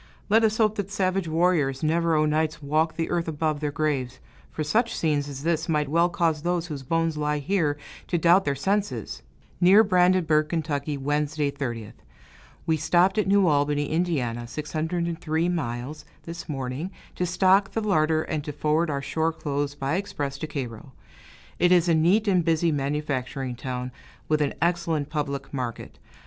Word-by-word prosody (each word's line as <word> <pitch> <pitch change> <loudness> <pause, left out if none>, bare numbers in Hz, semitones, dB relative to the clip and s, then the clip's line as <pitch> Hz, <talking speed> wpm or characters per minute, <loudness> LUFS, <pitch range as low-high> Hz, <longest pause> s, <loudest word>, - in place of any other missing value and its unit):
Let 220 +2 +5
us 220 0 +2
hope 215 -1 +2
that 200 -1 -3
savage 190 -2 0
warriors 160 -5 +1
never 165 +1 +2
o' 155 0 +3
nights 155 +1 0
walk 155 +3 0
the 165 - -2
earth 170 -1 0
above 155 -1 -1
their 150 0 -1
graves; 145 -4 -2 0.3
for 155 - -4
such 230 +10 +1
scenes 145 -3 0
as 140 0 -7
this 165 0 0
might 150 -3 +1
well 170 +3 +3
cause 165 -5 0
those 175 0 -1
whose 150 -5 -6
bones 165 +3 0
lie 150 0 0
here 150 -1 0 0.3
to 175 - 0
doubt 175 +3 +5
their 140 -4 -1
senses. 200 +8 -2 0.4
Near 195 +5 +7
Brandenburg, 180 -5 +3
Ky., 150 -3 -2
Wednesday, 145 +1 -1
30th. 120 -6 -5 0.7
We 160 -1 +2
stopped 175 +6 +3
at 210 - +1
New 200 0 +4
Albany, 145 -2 +1
Ind. 130 -9 -1
(603 160 +2 -2
miles), 145 -2 -3 0.2
this 170 0 -8
morning, 135 +4 -3 0.2
to 180 - -2
stock 190 +2 +3
the 225 - -2
larder 160 -6 +2
and 150 -2 -3
to 150 - -5
forward 155 +3 0
our 140 -1 -2
shore 160 +3 0
clothes 145 -2 -3
by 140 +4 -1
express 145 -8 -4
to 155 - -4
Cairo. 130 -3 -6 0.7
It 175 - +4
is 175 -1 +5
a 170 - +4
neat 180 +7 +3
and 185 -3 +3
busy 165 0 +2
manufacturing 135 -3 -2
town, 125 0 -5 0.4
with 155 -1 +1
an 145 - 0
excellent 165 -4 0
public 140 -3 -3
market. 125 -4 -5
155 Hz, 170 wpm, -25 LUFS, 145-175 Hz, 0.7 s, Near